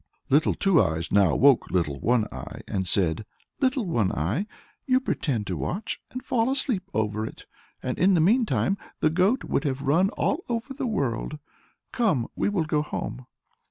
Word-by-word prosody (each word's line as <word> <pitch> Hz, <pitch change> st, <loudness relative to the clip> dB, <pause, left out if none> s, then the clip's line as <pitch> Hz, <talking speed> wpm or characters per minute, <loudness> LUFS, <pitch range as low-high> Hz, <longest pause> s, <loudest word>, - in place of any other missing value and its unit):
Little 150 Hz, +4 st, +4 dB
Two 195 Hz, -6 st, +4 dB
Eyes 80 Hz, +1 st, -1 dB
now 100 Hz, -6 st, +4 dB
woke 140 Hz, -1 st, +4 dB
Little 75 Hz, -6 st, 0 dB
One 120 Hz, -, +2 dB
Eye, -, -, -8 dB
and 95 Hz, -2 st, -2 dB
said, 90 Hz, +2 st, +1 dB, 0.4 s
"Little 260 Hz, -3 st, +1 dB
One 115 Hz, -, +1 dB
Eye, 105 Hz, -, -1 dB, 0.4 s
you 255 Hz, -1 st, +4 dB
pretend 135 Hz, -, -1 dB
to 95 Hz, -, -3 dB
watch, 200 Hz, +5 st, -3 dB
and 255 Hz, -, -7 dB
fall 230 Hz, 0 st, +1 dB
asleep 255 Hz, -8 st, -1 dB
over 105 Hz, 0 st, -1 dB
it, 110 Hz, -, -8 dB, 0.4 s
and 125 Hz, -, -3 dB
in 190 Hz, +1 st, +5 dB
the -, -, +3 dB
meantime 200 Hz, +1 st, +2 dB, 0.2 s
the 155 Hz, -, +2 dB
goat 190 Hz, +10 st, +2 dB
could -, -, -1 dB
have 140 Hz, -2 st, -2 dB
run 165 Hz, +8 st, +3 dB
all 340 Hz, +5 st, 0 dB
over 235 Hz, +3 st, -3 dB
the 270 Hz, -1 st, -3 dB
world; 150 Hz, -, -2 dB, 0.5 s
come, 190 Hz, -, +1 dB
we -, -, +1 dB
will 190 Hz, -6 st, 0 dB
go 150 Hz, -1 st, +1 dB
home." 130 Hz, -4 st, -5 dB
155 Hz, 175 wpm, -26 LUFS, -, 0.5 s, in